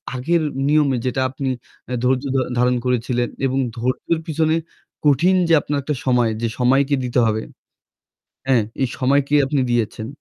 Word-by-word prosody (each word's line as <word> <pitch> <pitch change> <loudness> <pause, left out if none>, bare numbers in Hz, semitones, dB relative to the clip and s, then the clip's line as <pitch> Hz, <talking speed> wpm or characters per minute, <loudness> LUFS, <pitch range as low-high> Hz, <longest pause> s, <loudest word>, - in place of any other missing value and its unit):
আগের 165 +6 +1 0.3
নিয়মে 145 -4 +3
যেটা 130 +1 0
আপনি 135 +1 -3 0.4
অ্যা 125 - -3
ধৈর্য 130 +1 +2
ধ - - +3 0.2
ধারণ 125 +1 +3
করেছিলেন 120 0 0 0.2
এবং 135 0 0 0.2
ধৈর্যর 130 +7 -1
পিছনে 160 0 +1 0.5
কঠিন 165 +7 +4
যে 165 - +3
আপনার 145 0 -2
একটা 150 0 -2
সময়, 120 -3 +2
যে 115 - +1
সময়কে 135 +3 +3
দিতে 125 0 0
হবে, 110 0 0 1.0
হ্যাঁ, 125 -5 +3 0.2
এই 130 - +2
সময়কে 140 +2 +2
আপনি 135 0 0
দিয়েছেন 110 -1 -1
130 Hz, 155 wpm, -20 LUFS, 125-145 Hz, 1.0 s, কঠিন